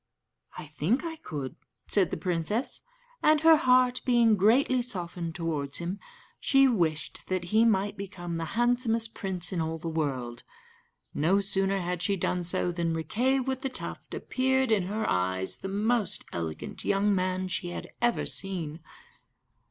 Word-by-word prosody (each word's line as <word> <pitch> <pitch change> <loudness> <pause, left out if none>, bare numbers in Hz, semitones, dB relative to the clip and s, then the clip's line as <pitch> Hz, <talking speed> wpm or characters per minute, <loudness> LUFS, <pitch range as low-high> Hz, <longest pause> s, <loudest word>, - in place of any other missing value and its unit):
"I - - -6
think 155 - 0
I 325 -1 -5
could," 145 - -6 0.3
said 195 -5 +2
the - - -3
princess, 185 +7 +1 0.4
and 305 -1 +4
her 325 0 +8
heart 255 -4 +3
being 235 -3 +4
greatly 245 +6 +3
softened 175 -7 -3
towards 150 -5 -2
him, 175 +4 -4 0.4
she 270 -1 +5
wished 170 - -1
that 185 -1 -1
he 225 +1 +5
might 205 -2 +1
become 180 -4 -5
the 165 - -3
handsomest 240 -2 +1
prince 185 -3 -3
in 175 - 0
all 160 0 -2
the 165 +1 -7
world. 135 -7 -2 0.7
No 175 +7 +2
sooner 195 -1 +1
had 175 0 -3
she 200 +2 +1
done 180 -1 -1
so 180 0 +2
than 170 -1 -1
Riquet 245 - +1
with 260 0 -3
the 270 - -2
Tuft - - -6
appeared 265 -1 +1
in 200 -5 +3
her 215 +2 -2
eyes 95 +1 -1
the - - -5
most 210 0 0
elegant 80 -2 -5
young 200 +1 +2
man 185 0 0
she 180 -1 -2
had 175 - -7
ever 240 -1 +2
seen. 170 -5 -2
195 Hz, 160 wpm, -28 LUFS, 165-235 Hz, 0.7 s, her